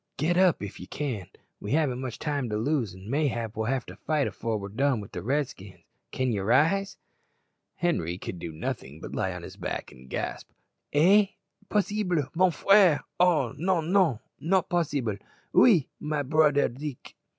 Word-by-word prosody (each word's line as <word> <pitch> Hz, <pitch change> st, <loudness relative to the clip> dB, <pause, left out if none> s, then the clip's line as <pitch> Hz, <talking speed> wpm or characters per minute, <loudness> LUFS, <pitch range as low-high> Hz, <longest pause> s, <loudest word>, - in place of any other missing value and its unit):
"Get 165 Hz, +4 st, +1 dB
up 180 Hz, -, +4 dB
if 100 Hz, -, -7 dB
ye 90 Hz, -, -9 dB
can; 125 Hz, -, -4 dB, 0.3 s
we 105 Hz, -, -4 dB
haven't 140 Hz, -5 st, +1 dB
much 130 Hz, -3 st, -5 dB
time 145 Hz, -5 st, -2 dB
to 105 Hz, -, -1 dB
lose, 115 Hz, -4 st, 0 dB
an' 95 Hz, +2 st, -12 dB
mayhap 120 Hz, -5 st, -1 dB
we'll 110 Hz, 0 st, -2 dB
have 130 Hz, 0 st, -1 dB
to -, -, -10 dB
fight 155 Hz, -3 st, 0 dB
afore 115 Hz, -2 st, -2 dB
we're 100 Hz, -1 st, -6 dB
done 130 Hz, +3 st, +1 dB
wi' 100 Hz, -, -8 dB
the -, -, -5 dB
Redskins. 125 Hz, -7 st, -3 dB, 0.3 s
Can 130 Hz, -1 st, -1 dB
ye 105 Hz, -, -1 dB
rise?" 165 Hz, -, +2 dB, 0.8 s
Henri 90 Hz, -, -1 dB
could 90 Hz, -1 st, -6 dB
do 85 Hz, -, -5 dB
nothing 80 Hz, -1 st, -5 dB
but -, -, -8 dB
lie -, -, -1 dB
on -, -, -7 dB
his -, -, -10 dB
back -, -, -4 dB
and 65 Hz, +1 st, -15 dB
gasp, -, -, -4 dB, 0.4 s
"Eh! 195 Hz, +8 st, +5 dB, 0.4 s
possible! 200 Hz, -5 st, +1 dB
mon 185 Hz, +2 st, +4 dB
frere! 190 Hz, -1 st, +5 dB, 0.2 s
Oh, 165 Hz, -9 st, +3 dB
non, 170 Hz, +1 st, 0 dB
non, 180 Hz, -, +4 dB, 0.2 s
not 185 Hz, +2 st, +1 dB
possible. 140 Hz, -, 0 dB, 0.4 s
Oui! 185 Hz, -, +6 dB
my 150 Hz, -1 st, -2 dB
broder 150 Hz, 0 st, +3 dB
Deek!" 135 Hz, +1 st, -8 dB
145 Hz, 175 wpm, -27 LUFS, 110-170 Hz, 0.8 s, Oui